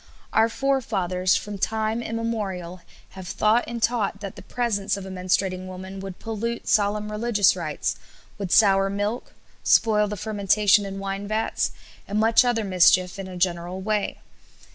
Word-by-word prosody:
Our 225 +1 +4
forefathers, 195 -9 0
from 200 +2 -4
time 220 +3 -1
immemorial, 205 -7 -4 0.3
have 190 -2 -10
thought 215 +6 +2
and 235 0 -4
taught 225 -4 0
that 200 -2 -6
the - - -10
presence 215 -5 -1
of 195 - -7
a 190 - -7
menstruating 185 0 -1
woman 190 +1 -8
would 195 -1 -7
pollute 230 +1 -4
solemn 210 0 +1
religious 210 -3 +3
rites, 165 -4 -3 0.4
would 195 -3 -4
sour 195 -2 +5
milk, 205 +4 -3 0.3
spoil 210 -2 +4
the 210 0 -5
fermentation 205 -1 +2
in 195 0 -6
wine 195 +1 -4
vats, 215 +1 0 0.4
and 205 +1 -1
much 225 +2 +5
other 240 -3 +1
mischief 185 0 +3
in 195 - -5
a 185 -1 -8
general 175 0 -1
way. 210 +1 -1
200 Hz, 155 wpm, -24 LUFS, 185-220 Hz, 0.4 s, sour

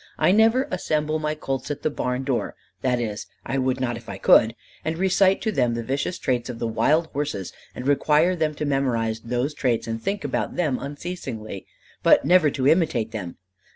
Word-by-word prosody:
"I - - +4
never 225 +6 +4
assemble 155 -3 0
my 155 0 -1
colts 135 -2 -4
at 145 - -4
the 155 - +1
barn 125 -1 -2
door 130 -3 -2 0.3
that 125 -2 +1
is, 110 -3 -4 0.2
I 135 +3 -1
would 130 0 0
not 120 -2 -1
if 115 -2 -12
I 100 - -5
could 110 +3 +5 0.3
and 160 +1 -2
recite 190 +1 +3
to 220 - +1
them 125 - +1
the 115 - -3
vicious 140 +8 -2
traits 125 -2 -1
of 120 - -5
the 115 - -3
wild 150 +8 +2
horse 140 -10 -3 0.2
and 125 - -6
require 150 +5 +3
them 155 -3 -1
to 150 - -3
memorize 120 -6 0
those 125 +5 -2
traits 125 -5 0
and 115 0 -4
think 200 - -2
about - - -2
them 150 -8 0
unceasingly, 140 - -6 0.3
but - - +5
never 175 -4 +5
to 130 -1 -1
imitate 150 -9 +2
them. 95 -6 -6
135 Hz, 195 wpm, -24 LUFS, 120-155 Hz, 0.3 s, could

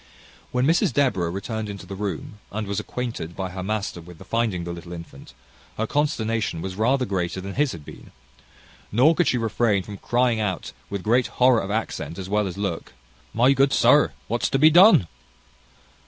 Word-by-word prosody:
When 125 +1 +1
Mrs 160 -1 +3
Deborah 120 -12 +1
returned 105 +4 -4
into 100 -1 -8
the 100 - -8
room, 100 +1 -5
and 105 +1 -3
was 100 0 -2
acquainted 115 -9 -5
by 95 -1 -4
her 95 +1 -6
master 100 -2 -3
with 85 0 -13
the - - -13
finding 115 -7 -1
the 85 0 -5
little 85 0 -9
infant, 85 -5 -11 0.4
her 110 - 0
consternation 115 - -1
was 95 +3 -5
rather 125 +6 +1
greater 95 -3 -2
than 100 +1 -6
his 145 +2 +1
had 75 -3 -10
been; - - -12 0.8
nor 130 +9 +5
could 175 0 +1
she 125 - +2
refrain 110 -3 +1
from 100 +1 -8
crying 120 +1 +1
out, 100 -4 -2 0.2
with 100 -2 -4
great 120 +3 +2
horror 125 -2 +3
of 95 - -5
accent 110 -5 -3
as 95 -1 -6
well 105 +1 +1
as 90 0 -6
look, 100 -5 -4 0.4
"My 125 +4 +4
good 135 0 +3
sir! 145 +2 +5 0.2
what's 120 +1 0
to - - +1
be 155 +3 +6
done?" 180 - +7
105 Hz, 190 wpm, -24 LUFS, 95-125 Hz, 0.8 s, done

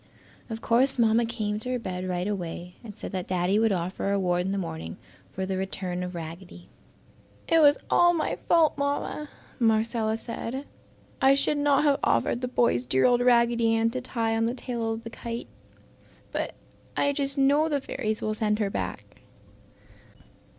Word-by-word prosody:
Of 225 0 -5
course 255 +4 +2
Mamma 230 0 +3
came 215 -3 -2
to 250 - -5
her 255 - 0
bed 185 -5 -4
right 180 +1 -1
away 180 -3 -4
and 215 -3 -9
said - - -7
that 185 -2 -4
Daddy 185 +3 +1
would 225 -1 +3
offer 185 +1 -2
a - - +1
reward 180 -2 +1
in - - -1
the 200 - -1
morning 80 - -5 0.3
for 190 - -3
the 190 0 -2
return 185 -1 -3
of 180 0 -5
Raggedy. 170 +2 -9 0.8
"It 330 - +4
was 290 -2 +6
all 345 0 +5
my 330 -3 -1
fault, 330 -2 +3
Mamma!" 285 +1 -2 0.3
Marcella 225 -1 +1
said. 240 +4 -5 0.6
"I 270 +1 +6
should 290 +1 +1
not 285 0 +3
have 285 -2 +3
offered 115 - +1
the 250 - -1
boys 235 - +1
dear 130 +1 +3
old 245 -1 +4
Raggedy 235 -2 +4
Ann 225 0 +2
to 255 +1 -3
tie 230 -3 -1
on 225 0 +1
the 240 - -2
tail 235 -3 -3
of 225 0 -4
the 230 - -8
kite! 235 0 -6 0.8
But - - -3 0.4
I 285 - +2
just 275 0 -1
know 285 +3 +4
the 290 -2 +1
fairies 215 -5 -3
will 215 - 0
send 210 -1 0
her 205 -2 -1
back." - - -5
225 Hz, 180 wpm, -27 LUFS, 190-255 Hz, 0.8 s, was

